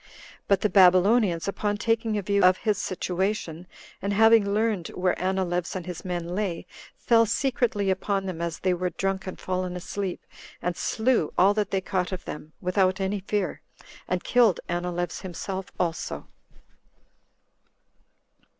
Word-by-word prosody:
But 200 - +3
the 210 - +2
Babylonians, 185 0 +5
upon 205 +1 -1
taking 225 -1 0
a 205 - -2
view 200 +1 +1
of 185 0 +6
his 210 -3 0
situation, 180 -2 -2 0.3
and 200 +1 -1
having 220 -1 +5
learned 210 -4 0
where 180 0 +1
Anileus 185 -2 -1
and 185 - -4
his 180 -2 -7
men 175 -2 -3
lay, 185 -4 -2 0.3
fell 230 -1 +4
secretly 240 -6 +1
upon 195 +1 -1
them 180 -3 -4
as 170 -1 -2
they 185 -1 +2
were 180 +1 -1
drunk 195 +1 -2
and 185 - -6
fallen 185 -1 -2
asleep, 185 +1 -4 0.3
and 175 0 -2
slew 225 -7 +1
all 195 +3 +5
that 205 -2 -1
they 195 - 0
caught 185 -1 -2
of 185 -1 -5
them, 150 +1 -7
without 185 +1 +1
any 195 +1 -1
fear, 200 0 -2 0.5
and 185 0 -1
killed 235 -7 +4
Anileus 175 0 -3
himself 190 +1 -5
also. 170 -2 -2
190 Hz, 150 wpm, -26 LUFS, 180-205 Hz, 0.5 s, of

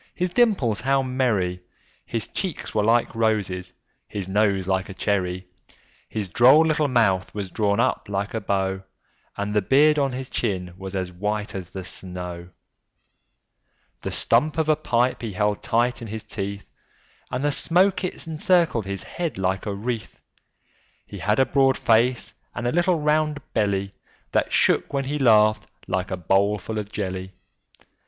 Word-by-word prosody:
his 180 0 -1
dimples 180 - +2
how 135 0 +2
merry! 110 -9 0 0.5
His 115 -2 -2
cheeks 185 -5 -4
were 105 - +2
like 115 +2 +2
roses, 100 -5 0 0.4
his 100 -3 -5
nose 100 -1 +1
like 95 0 0
a 95 - -8
cherry! 95 -3 -1 0.6
His 105 -3 -3
droll 130 - +6
little 155 -1 +2
mouth 110 -8 +2
was 100 -3 -4
drawn 100 0 +1
up 125 -1 +1
like 100 0 -2
a 115 - -2
bow, 95 -1 -1 0.6
And 100 +1 -2
the 105 - +3
beard 150 +8 +4
of 135 -1 +1
his 130 0 -5
chin 90 -6 -2
was 95 +1 -7
as 95 -1 -2
white 105 +3 -3
as 95 -3 -6
the 95 -1 -7
snow; 90 -1 -7 1.5
The - - -3
stump 155 +1 +1
of 160 -1 +1
a 155 - +5
pipe 125 -2 0
he 115 -4 -4
held 105 +1 0
tight 120 +1 +1
in 115 - -6
his 110 +1 -5
teeth, 100 -1 -6 0.6
And 125 +2 -3
the 145 - +2
smoke 185 +6 +2
it 180 - -3
encircled 165 - +2
his 100 0 -4
head 170 -3 -4
like 95 +1 -1
a 100 - -2
wreath; 115 +2 -4 0.9
He - - -9
had 105 +3 +1
a 130 - +5
broad 135 -1 +3
face 120 +2 +2 0.2
and 120 - -4
a 120 - +1
little 175 0 +2
round 150 0 +1
belly, 100 -2 0 0.4
That - - +1
shook - - +2
when 135 -1 0
he 145 +2 -2
laughed, 110 -4 +4 0.2
like 95 0 -1
a 95 - -3
bowlful 100 +4 0
of 105 0 -6
jelly. 95 -2 -4
110 Hz, 165 wpm, -24 LUFS, 95-135 Hz, 1.5 s, droll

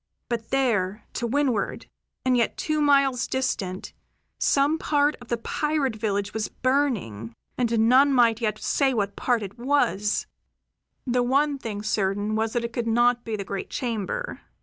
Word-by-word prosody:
But 230 -2 -3
there, 220 -7 0
to 235 - -2
windward, 255 -4 0 0.4
and 255 -1 +3
yet 235 -2 +1
two 310 -1 -1
miles 275 -3 +3
distant, 195 -8 -2 0.5
some 290 +3 +2
part 295 -1 +2
of 245 - -12
the 235 - -1
pirate 285 +1 -1
village 205 -2 -2
was 220 -1 -2
burning, 215 - -1 0.2
and 230 -2 +2
none 270 +4 +6
might 235 -4 +4 0.2
say 275 +5 +1
yet 260 -3 0
what 200 -1 -1
part 240 -4 0
it 200 +4 -8
was. 210 -7 +1 0.8
The 250 -1 +1
one 280 +3 +1
thing 210 -4 -5
certain 205 0 0
was 220 0 0
that 240 -1 0
it 235 - -6
could 235 -1 -2
not 240 +1 +3
be 225 - -3
the 200 - -4
great 195 0 -5
chamber. 240 - -3
235 Hz, 160 wpm, -25 LUFS, 210-270 Hz, 0.8 s, none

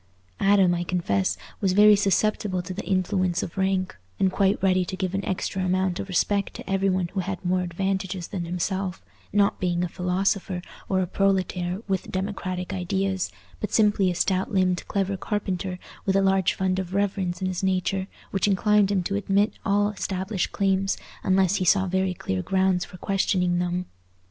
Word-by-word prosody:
Adam, 195 -3 +4
I 175 0 -1
confess, 100 - 0 0.2
was 190 -2 +1
very 210 +1 +7
susceptible 200 -1 +1
to 185 - -6
the 195 - -5
influence 185 -1 +1
of - - -6
rank, 190 -1 0 0.2
and 190 - +3
quite 195 +1 +2
ready 185 -1 +3
to 185 +2 -5
give 185 -1 -2
an 195 0 -1
extra 190 0 -2
amount 185 0 0
of 195 - -5
respect 200 +2 0
to - - -9
every 195 0 +1
one 185 -2 0
who 195 - -3
had 185 0 -4
more 180 +1 +2
advantages 190 0 -2
than 175 -3 -3
himself, 185 +2 -3 0.3
not 200 -1 +2
being 175 -1 0
a - - 0
philosopher 185 +1 -1 0.3
or 190 -1 +2
a - - +1
proletaire 185 0 0
with 190 -1 -2
democratic 185 -1 -3
ideas, 190 0 -1 0.3
but 210 - -3
simply 205 -3 +3
a 175 - -2
stout 185 +2 0
limbed 185 -2 +1
clever 195 -1 -1
carpenter 190 -2 -2 0.3
with 190 - +2
a 195 - +4
large 190 -1 +2
fund 190 0 0
of 185 0 -4
reverence 195 -3 0
in 190 - -2
his 185 -1 -2
nature, 190 0 0 0.2
which 195 0 +1
inclined 205 0 +3
him 195 -3 +1
to 200 - -3
admit 200 +1 +1
all 205 0 +2
established 190 -1 -2
claims 195 -1 +1 0.2
unless 190 +1 +3
he 185 - 0
saw 190 +2 +4
very 190 0 0
clear 95 - -2
grounds 190 - +1
for 180 - -11
questioning 180 -2 +1
them. 180 +1 -1
190 Hz, 180 wpm, -25 LUFS, 180-195 Hz, 0.3 s, very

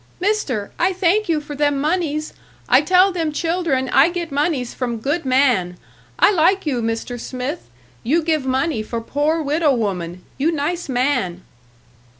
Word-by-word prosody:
"Mister, 355 - -1
I 370 +2 +2
thank 375 +2 +1
you 320 -2 +2
for 295 0 -8
them 290 -1 +1
moneys. 305 -1 -1 0.3
I - - +5
tell 370 +1 +4
them 330 -4 -2
children 325 -4 -1
I 280 +5 +5
get 345 -3 -4
moneys 280 -4 -1
from 240 -3 -3
good 285 +8 -2
man. 250 -10 +2 0.4
I - - +5
like 380 +1 +2
you, 260 -6 -1
Mister 230 +2 -3
Smith, 250 - -5 0.3
you 315 +7 +1
give 310 -3 0
money 265 0 0
for 230 +2 -4
poor 295 +7 -1
widow 295 -1 +2
woman 180 -5 -3 0.2
you 310 +5 +2
nice 325 +2 -2
man." 250 -9 0
290 Hz, 155 wpm, -20 LUFS, 250-335 Hz, 0.4 s, I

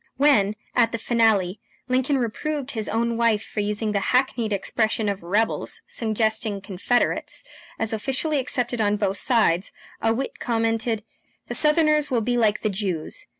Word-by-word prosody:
When, 215 -8 +4 0.2
at 230 -2 +4
the 230 - -2
finale, 220 -5 +2 0.3
Lincoln 260 +2 +1
reproved 275 +4 -3
his 220 -3 -3
own 230 +1 0
wife 230 -2 +2
for - - -6
using 210 +1 -1
the 205 - +1
hackneyed 245 0 +1
expression 215 +2 0
of 200 -1 -2
rebels, 205 +6 -1
suggesting 220 -2 0
Confederates, 205 - -1 0.3
as 225 0 -2
officially 270 +7 -1
accepted 245 -2 0
on 210 0 +2
both 200 -1 0
sides, 205 -8 +2 0.3
a 225 - +2
wit 255 +4 -3
commented: 225 -1 -1 0.5
"The - - -2
Southerners 305 -1 +4
will 245 -4 +1
be 245 +2 0
like 220 -3 +2
the 215 - 0
Jews. 195 - -4
225 Hz, 150 wpm, -24 LUFS, 210-250 Hz, 0.5 s, When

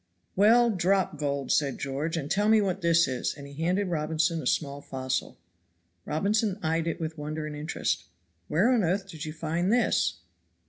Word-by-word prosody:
"Well, 230 +4 +5
drop 185 -4 +1
gold," 140 -2 -2
said 140 -3 +1
George, 145 +5 -3
"and 145 -2 -4
tell 205 +2 +2
me 220 0 +6
what 195 -2 -1
this 170 -1 +4
is," 130 -2 -2
and 140 - -10
he 140 +2 -9
handed 185 +3 +1
Robinson 160 0 0
a 130 - -4
small 140 0 -1
fossil. 130 -1 -3 0.7
Robinson 200 +5 0
eyed 165 +1 0
it 165 - -2
with 160 -1 -4
wonder 155 +1 -4
and 150 -1 -6
interest. 150 - -2 0.4
"Where 190 +11 +3
on 240 -5 +3
earth 190 +3 0
did 165 -4 -7
you 155 - -4
find 165 +4 -1
this?" 220 - +2
165 Hz, 180 wpm, -28 LUFS, 150-190 Hz, 0.7 s, me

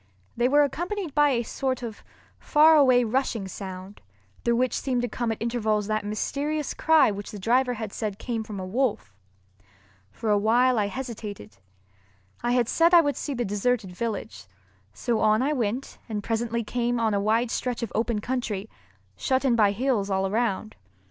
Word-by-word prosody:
They 240 +2 +2
were 290 +2 +5
accompanied 345 +4 -3
by 295 0 +4
a 240 -3 +1
sort 255 +2 -3
of 225 -3 -7 0.4
far 315 +1 +5
away 255 -4 +5
rushing 230 -3 -1
sound, 190 +1 -8 0.4
through 235 0 +2
which 255 +1 +1
seemed 250 -3 -1
to - - 0
come 240 -1 -2
at 220 - -4
intervals 220 -3 0
that 215 0 -1
mysterious 285 +8 -2
cry 320 -7 +4
which 205 0 -6
the 215 - -8
driver 245 +5 +1
had 220 -2 -6
said 210 -3 -3
came 230 -2 -3
from 215 -3 -7
a 185 - -4
wolf. 200 - -1 1.0
For 215 - -2
a 205 - +4
while 240 +3 +3
I 205 - +1
hesitated. 205 - -7 0.8
I 240 0 0
had 245 -2 +2
said 335 +6 +4
I 340 - +9
would 290 -3 -1
see 285 - -4
the 240 -1 -1
deserted 205 0 -1
village, 200 - -5 0.4
so 235 - -1
on 215 +3 +3
I 295 +3 +1
went 245 0 -3
and 210 -2 -3
presently 230 +1 -1
came 240 +2 -1
on 220 -2 +1
a 200 - +1
wide 225 +3 +1
stretch 245 -2 -2
of 230 - -4
open 225 -1 0
country, 220 -4 -3 0.4
shut 265 +1 0
in 250 -3 +3
by 210 -3 +4
hills 220 -2 0
all 190 0 +1
around. 215 0 -1
235 Hz, 180 wpm, -26 LUFS, 210-255 Hz, 1.0 s, I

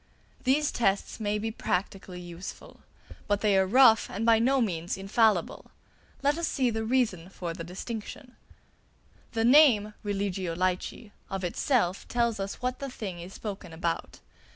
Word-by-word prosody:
These 290 +3 +3
tests 195 -2 0
may 210 -1 0
be 225 +1 -3
practically 190 -2 -3
useful; 175 +1 -9 0.5
but 205 0 +1
they 210 -2 +3
are 190 0 +3
rough 230 0 +6
and 210 +4 -3
by 230 -1 +5
no 265 +4 +3
means 175 -7 -1
infallible. 195 -1 +1 0.5
Let 290 +3 +2
us 335 - 0
see 255 -3 +1
the 220 0 -2
reason 220 -8 0
for 175 -3 -5
the 165 - -7
distinction. 225 - -7 1.0
The 225 0 +1
name 240 -6 +6
"Religio 195 -4 -2
Laici" 185 +4 -2 0.2
of 195 -1 -4
itself 185 0 0
tells 235 -3 0
us 195 +5 -5
what 250 0 -1
thing 220 -10 -6
is 175 +3 -9
spoken 195 -5 -7
about. 165 0 -3
205 Hz, 150 wpm, -28 LUFS, 185-235 Hz, 1.0 s, rough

